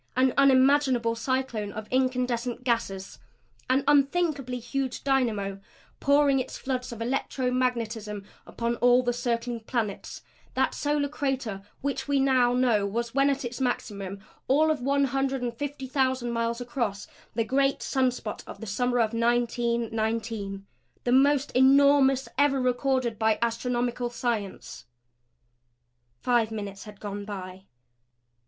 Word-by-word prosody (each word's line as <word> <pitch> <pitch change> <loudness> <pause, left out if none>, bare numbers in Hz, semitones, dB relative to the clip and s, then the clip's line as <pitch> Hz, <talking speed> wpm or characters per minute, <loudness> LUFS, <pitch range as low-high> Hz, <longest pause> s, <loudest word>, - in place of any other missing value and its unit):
An 255 0 +3
unimaginable 265 -3 +4
cyclone 230 -3 -2
of 215 0 -6
incandescent 250 -1 0
gases; 195 - -2 0.5
an 265 +1 +3
unthinkably 280 -3 +2
huge 260 +2 -3
dynamo 220 -8 0 0.4
pouring 280 -1 +4
its 260 - -4
floods 255 -1 -3
of 230 -1 -5
electro 255 +1 -1
magnetism 225 -5 -2 0.2
upon 235 0 -2
all 245 +1 +4
the 245 0 0
circling 235 0 -2
planets; 220 -3 -4 0.3
that - - +1
solar 290 0 0
crater 265 -8 -3 0.2
which 280 +1 -2
we 285 -1 +2
now 260 -2 +3
know 245 -5 +3
was, 230 +3 -3
when 275 +1 +3
at 275 -1 -1
its 240 +2 -5
maximum, 200 -6 -2 0.3
all 310 +4 +4
of 300 -4 -2
one 280 +2 +2
hundred 270 0 0
and 240 -1 -2
fifty 285 0 -5
thousand 260 -2 0
miles 230 0 -1
across; 235 -5 -3 0.3
the 230 - +2
great 275 +3 +1
sun 260 -1 +2
spot 230 -4 -6
of - - -9
the 225 - -7
summer 245 +4 0
of 230 -1 +2
1919 230 -3 -1 0.4
the 245 - 0
most 280 +2 +4
enormous 270 0 +5
ever 285 -1 +4
recorded 255 -2 0
by 220 -1 +3
astronomical 240 +1 -1
science. 230 -5 -4 1.3
Five 240 -3 +2
minutes 205 -2 -6
had 210 -1 -12
gone 205 -1 -5
by. 190 -2 -8
245 Hz, 135 wpm, -27 LUFS, 230-270 Hz, 1.3 s, enormous